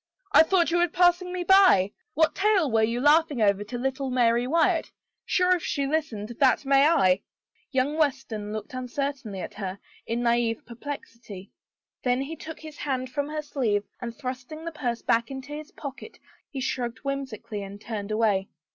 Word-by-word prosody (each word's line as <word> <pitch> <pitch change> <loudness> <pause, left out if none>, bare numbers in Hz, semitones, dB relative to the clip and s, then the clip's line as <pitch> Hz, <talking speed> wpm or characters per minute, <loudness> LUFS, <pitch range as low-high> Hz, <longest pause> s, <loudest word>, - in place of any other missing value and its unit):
" - - -46
I - - +8
thought 340 +1 +3
you 345 - +2
were 350 - +4
passing 355 +1 +3
me 360 -1 -2
by. 370 - +6 0.2
What 320 +1 +3
tale 390 - +2
were 225 0 +3
you 230 +2 +1
laughing 295 0 +4
over 200 -1 +3
to 245 +4 -5
little 265 +2 -2
Mary 240 -1 +2
Wyatt? 330 +4 +2 0.4
Sure, 365 0 +3
if - - -11
she 280 - -1
listened, 275 -8 -2
that 270 0 +3
may 275 +1 +5
I! 200 - +4 0.3
" - - -41
Young 275 +3 0
Weston 265 -8 -1
looked 215 +1 -6
uncertainly 255 -5 -4
at - - -6
her, 195 -2 -5 0.3
in 235 +1 -1
naive 235 -1 +1
per 240 - -10
plexity. 230 -7 -8 0.5
Then 250 +1 +1
he 310 +4 -6
took 320 0 -9
his 310 -2 -10
hand 260 -3 -3
from 285 +2 -2
her 305 0 -3
sleeve 230 -9 0 0.2
and 235 -1 -6
thrusting 260 +3 -6
the 335 - -3
purse 245 -6 -3
back 230 0 +2
into 270 +2 -7
his 305 +3 -7
pocket 280 - -9 0.3
he 270 - -5
shrugged 245 -2 -2
whimsically 260 -6 -4
and 200 +1 -8
turned 210 -2 -5
away. 215 -3 +1
260 Hz, 185 wpm, -26 LUFS, 230-305 Hz, 0.5 s, I